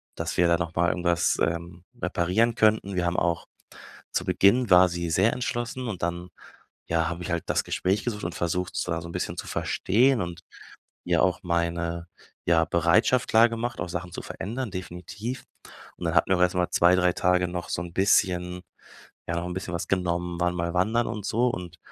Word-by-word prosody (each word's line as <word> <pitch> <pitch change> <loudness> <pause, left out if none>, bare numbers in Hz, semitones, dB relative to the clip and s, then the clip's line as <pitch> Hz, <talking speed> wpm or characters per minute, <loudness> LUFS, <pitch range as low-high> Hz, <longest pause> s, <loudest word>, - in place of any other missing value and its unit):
dass 85 -1 -4
wir 90 - +4
da 85 0 +3
noch 85 -1 -4
mal 85 0 +3
irgendwas, 85 -1 +1
ähm, 85 +1 -2 0.2
reparieren 90 +7 +1
könnten. 105 -3 +2
Wir 90 -1 0
haben 85 0 0
auch 85 -1 0 0.7
zu - - -1
Beginn 120 +4 +3
war 90 0 +7
sie 85 -1 -3
sehr 95 +7 +3
entschlossen 120 0 -3
und 95 -6 -5
dann, 85 +1 -3 0.6
ja, 80 -1 +1
habe 85 +1 -5
ich - - -6
halt 85 -1 -1
das - - +1
Gespräch 95 +3 -1
gesucht 105 -4 -3
und 85 - -4
versucht 90 +1 -2
sie 90 - -2
da 85 0 -1
so 85 - -8
'n - - -7
bisschen - - -3
zu - - -5
verstehen 120 +5 +2
und 85 -1 -5 0.6
ja - - +2
auch 95 - +1
meine, 85 -1 -1 0.4
ja, 80 -1 +3
Bereitschaft 90 +10 +2
klargemacht, 115 +1 +2
auch 85 - -3
Sachen 90 0 -5
zu - - -5
verändern, 120 +3 -5
definitiv. 95 +6 -6 0.5
Und - - -6
dann - - -1
hatten - - +3
wir 95 - +3
erst 90 0 +3
mal 90 -1 +1
2, 85 +1 +5
3 90 -1 +3
Tage 90 0 +2
noch 90 0 -5
so - - -2
'n 85 0 -7
bisschen 90 -2 +2 0.7
ja, 85 - -2
noch 85 +1 -2
'n 90 - -4
bisschen 95 -1 -5
was 85 - -3
genommen, 90 -2 -1
waren 90 0 +1
mal 85 0 -2
wandern 110 +6 +1
und 105 -4 -5
so. 120 +3 +2
Und 90 -6 -6
90 Hz, 200 wpm, -26 LUFS, 85-100 Hz, 0.7 s, war